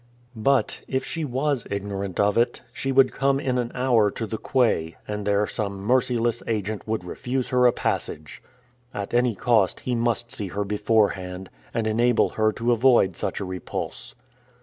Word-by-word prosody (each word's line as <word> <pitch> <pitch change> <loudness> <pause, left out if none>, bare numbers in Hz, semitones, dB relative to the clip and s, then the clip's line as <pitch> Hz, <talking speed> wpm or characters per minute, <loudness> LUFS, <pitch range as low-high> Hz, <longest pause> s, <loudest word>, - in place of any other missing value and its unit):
But, 130 +5 +1
if 130 0 -1
she 165 -3 -4
was 135 -2 -1
ignorant 100 -2 -4
of 100 0 +3
it, 120 +1 +1
she 135 - -2
would 130 -1 +5
come 135 0 +1
in 130 -3 0
an 120 -1 -2
hour 120 -5 +3
to 110 - -4
the 110 0 -5
quay, 95 - +1
and 105 -1 -4
there 100 0 +3
some 100 -2 -4
merciless 120 +1 +1
agent 110 -1 -2
would 110 -4 -1
refuse 125 +8 -3
her 125 -1 +4
a - - +5
passage! 75 -8 -3 0.5
At 100 +1 -4
any 120 -2 +2
cost, 110 -2 +2
he 125 - -2
must 120 0 0
see 105 -7 -4
her 100 +3 -2
beforehand, 100 -3 0 0.2
and 115 - -1
enable 120 +2 +3
her 110 0 +1
to 115 +3 0
avoid 120 -6 +4
such - - -3
a 100 - -3
repulse. 90 -1 -6
115 Hz, 170 wpm, -24 LUFS, 100-125 Hz, 0.5 s, would